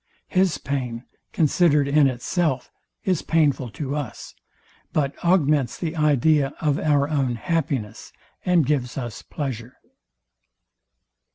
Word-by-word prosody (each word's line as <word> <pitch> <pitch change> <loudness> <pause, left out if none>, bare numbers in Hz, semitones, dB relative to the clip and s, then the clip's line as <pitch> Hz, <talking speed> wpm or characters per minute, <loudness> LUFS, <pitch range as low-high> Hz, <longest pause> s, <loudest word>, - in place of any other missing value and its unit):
His 185 -6 +2
pain, 125 -4 -3 0.3
considered 150 -2 +3
in 145 0 +4
itself, 130 +2 -1 0.3
is 185 -4 +1
painful 145 -6 +1
to 140 -1 -4
us, 145 -7 -6 0.6
but 145 -2 +1
augments 150 -8 +2
the 165 -1 -3
idea 150 -1 +2
of 150 -2 +1
our 145 -2 +2
own 135 -5 0
happiness, 125 -6 -2 0.3
and 180 -5 +3
gives 130 -3 -1
us 120 -5 -5
pleasure. 125 -4 -5
145 Hz, 110 wpm, -23 LUFS, 130-155 Hz, 0.6 s, in